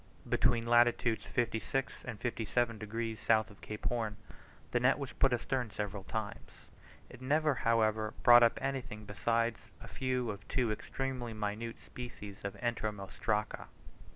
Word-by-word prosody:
Between 120 -2 +2
latitudes 120 -1 +3
56 120 +3 -1
and 120 -5 -5
57 115 -1 0
degs. 110 +1 -3
south 110 -1 +3
of 100 - -17
Cape 105 0 -7
Horn, 110 -3 -1 0.5
the 120 - +2
net 125 +4 +4
was 140 -4 -5
put 135 - +3
astern 125 0 0
several 105 -2 -4
times; 110 -2 -4 0.6
it - - -13
never, 150 +3 +3
however, 110 -3 +1
brought 120 0 +9
up 115 -1 +5
anything 130 -6 -3
besides 115 +3 0
a - - -10
few 125 -3 -1
of 100 +3 -10
two 125 -4 +1
extremely 125 +1 -3
minute 105 +2 -3
species 105 -5 -9
of 100 -1 -4
Entomostraca. 105 -2 -2
115 Hz, 140 wpm, -33 LUFS, 105-125 Hz, 0.6 s, brought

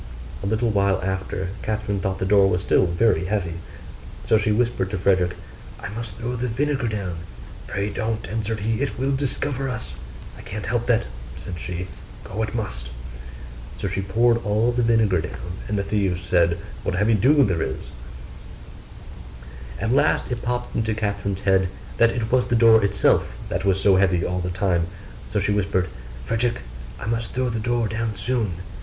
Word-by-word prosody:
A 100 - -2
little 110 +2 +1
while 100 -2 +2
after, 95 -1 -2
Catherine 105 -2 -1
thought 95 0 -1
the 95 - -1
door 100 0 +5
was 90 -1 +1
still 95 - +3
very 95 +3 +2
heavy: 90 -4 -1 0.7
so - - +5
she 105 0 +3
whispered 115 -4 +1
to 100 - -2
Frederick, 90 -1 +2 0.4
'I - - -6
must 115 +2 -6
throw 120 +2 -3
the 125 +1 -1
vinegar 135 +2 0
down.' 100 -6 -3 0.5
'Pray 100 +1 -2
don't,' 110 -1 -2
answered 110 +1 -2
he, 110 +3 0
'it 140 - -1
will 135 +2 0
discover 135 0 -1
us.' 115 -3 -5 0.5
'I - - -8
can't 105 +1 -6
help 120 -1 -1
that,' 115 -2 +3 0.3
said 90 -2 -6
she, 90 +2 -4 0.4
'go 105 +3 -4
it 110 +1 -2
must.' - - -4 0.9
So - - -2
she 95 +1 -1
poured 115 +4 +3
all 110 +3 +2
the 120 0 0
vinegar 110 -6 +3
down; 90 +1 -6
and 105 - -1
the 100 - +1
thieves 95 -4 0
said, 85 -1 +3 0.2
'What - - -1
a - - -2
heavy 105 +3 +3
dew 140 +8 +5
there 90 -8 +1
is!' - - -4 1.9
At 110 +2 +1
last 140 - +3
it 120 - -2
popped 125 0 -2
into 110 -1 0
Catherine's 100 -2 -2
head 95 -2 +3 0.3
that 115 - +6
it 115 -1 -2
was 125 -1 +3
the 120 - +2
door 115 -1 +6
itself 100 -10 +2
that 90 +2 -2
was 95 -1 +3
so 95 -1 +5
heavy 95 -3 +3
all 90 0 -1
the 90 0 -2
time: 85 -2 +1 0.4
so - - +1
she - - +1
whispered, 95 -2 +1 0.4
'Frederick, 115 +1 0 0.4
I - - -6
must 115 +1 -2
throw 130 0 0
the 115 -1 -2
door 120 0 +1
down 110 0 -2
soon. 110 -1 0
105 Hz, 185 wpm, -23 LUFS, 95-115 Hz, 1.9 s, that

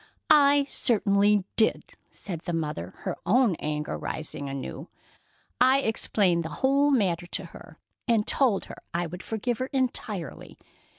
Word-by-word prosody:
"I 285 -1 +6
certainly 205 -6 +2
did," 220 - +1 0.2
said 175 -5 -7
the 175 +1 -5
mother, 150 - -4
her - - -3
own 220 +4 +3
anger 150 0 -3
rising 145 -2 -5
anew. 135 +3 -6 0.7
"I 260 +2 +5
explained 195 -7 +1
the 160 - -5 0.2
whole 280 +2 +4
matter 185 -10 +1
to - - -3
her, - - -13 0.3
and 225 -3 +2
told 245 -8 +2
her - - -11
I 175 0 0
would 175 +2 -7
forgive 225 +2 -3
her 255 - -2
entirely. 230 - -3
205 Hz, 140 wpm, -27 LUFS, 170-255 Hz, 0.7 s, I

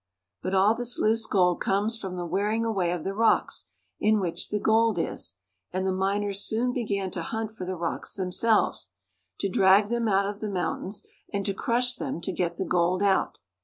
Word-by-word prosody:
But 185 +1 -2
all 195 +3 +5
this 240 +1 +1
loose 225 +1 +2
gold 180 -3 +2
comes 205 +4 +1
from 190 -5 -6
the 175 -1 -4
wearing 205 +6 0
away 195 -6 0
of 175 -3 -3
the 195 - -2
rocks 225 +2 +2 0.3
in 215 0 +3
which 175 -4 -2
the 210 - -1
gold 220 -1 +3
is; 165 - -2 0.4
and 185 +1 -2
the 190 - +1
miners 200 +1 0
soon 240 +4 0
began 200 -6 -2
to 175 - -4
hunt 220 +4 -4
for 185 - -6
the 185 - -2
rocks 170 -1 -3
themselves, 200 +4 +1 0.5
to 200 - +1
drag 195 +2 +4
them 235 -1 0
out 195 -1 +3
of 205 0 -5
the 215 - -3
mountains, 190 +1 -3 0.3
and 200 -1 -2
to 200 - 0
crush 245 +4 +1
them - - -4
to 190 - -2
get 175 -1 -2
the 190 - -2
'gold 180 +2 +1
out. 195 -1 +2
200 Hz, 200 wpm, -27 LUFS, 185-220 Hz, 0.5 s, all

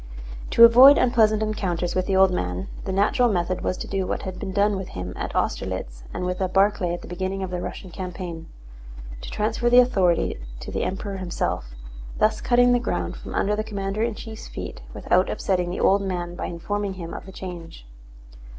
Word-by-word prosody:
To 230 - +6
avoid 255 +5 +9
unpleasant 220 -3 +3
encounters 180 -5 -2
with 185 0 -1
the 195 - +1
old 190 0 +5
man, 90 - -3 0.2
the 195 - -2
natural 205 +6 +3
method 180 -1 -1
was 185 - -1
to - - -6
do 190 -2 -2
what - - -3
had 185 -1 -6
been 190 - -4
done 205 +2 +2
with 190 -1 -5
him 90 0 -6
at - - -5
Austerlitz - - -2
and 180 - -4
with 180 0 -2
Barclay 195 -2 +2
at - - -10
the - - -9
beginning 190 +2 -3
of 185 - -4
the 180 -1 -3
Russian 185 0 -7
campaign—to - - -9
transfer 220 +3 0
the 245 - +5
authority 190 - +3 0.2
to - - -7
the - - -2
Emperor 195 +1 -4
himself, 170 - -3 0.4
thus 215 +1 +2
cutting 245 0 +4
the 245 - +3
ground 240 - -2
from - - -8
under 210 +1 +1
the 215 - -2
commander 200 -1 -3
in 230 -1 0
chief's 220 0 -9
feet - - -7
without - - +1
upsetting 180 -2 -1
the 180 - -4
old 200 +1 +4
man 175 -3 -3
by 175 - -4
informing 200 +3 -3
him 170 -3 -7
of - - -8
the - - -9
change. 175 - -9
190 Hz, 195 wpm, -24 LUFS, 175-210 Hz, 0.4 s, avoid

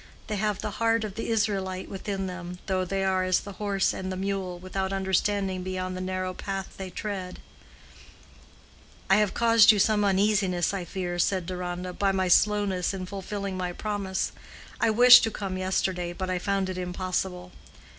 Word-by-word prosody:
"They 210 - -3
have 210 -1 -1
the 210 - -2
heart 230 0 +3
of 210 -3 -4
the 225 - -4
Israelite 195 -4 -1
within 195 0 -4
them, 180 -1 -6
though 185 -1 0
they 195 +1 -2
are 190 -1 +1
as 185 0 +2
the 200 - -8
horse 200 -2 +1
and 185 0 -4
the 185 - -4
mule, 190 -2 -3
without 190 +1 -3
understanding 190 0 0
beyond 185 0 -3
the 185 - -4
narrow 185 0 -3
path 195 0 -5
they 190 -1 -6
tread." 185 -1 -5 1.7
"I 195 - +7
have 210 -2 +1
caused 230 -2 +6
you 215 - +1
some 210 +1 +3
uneasiness, 195 -3 +2
I 190 -3 -3
fear," 175 0 -4
said 185 0 +1
Deronda, 180 0 -4
"by 195 +1 +1
my 190 -1 0
slowness 200 -1 +2
in 185 -1 -5
fulfilling 195 0 -5
my 180 -1 -3
promise. 200 -2 -2 0.5
I - - +3
wished 245 +3 +9
to - - 0
come 195 -3 -4
yesterday, 185 -1 -1
but 185 +1 -4
I 180 - 0
found 195 0 0
it 185 -1 -4
impossible." 180 0 -3
190 Hz, 175 wpm, -27 LUFS, 185-200 Hz, 1.7 s, wished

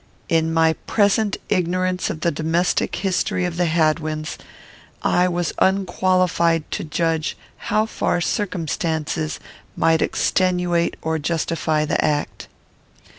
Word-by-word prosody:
In 160 -1 +2
my 160 0 +3
present 205 0 +2
ignorance 185 -1 0
of 155 - -5
the 170 - +2
domestic 165 +4 0
history 185 -1 0
of 175 -1 -3
the 175 -1 +2
Hadwins, 155 -1 0 0.6
I 180 +1 +3
was 175 -1 -1
unqualified 185 -3 +2
to - - -2
judge 160 0 -1 0.3
how 215 0 +3
far 220 - -1
circumstances 165 -4 -2 0.4
might 165 0 +3
extenuate 180 -2 +1
or 160 0 -1
justify 160 -1 0
the - - 0
act. 150 -1 -1
170 Hz, 115 wpm, -21 LUFS, 160-185 Hz, 0.6 s, my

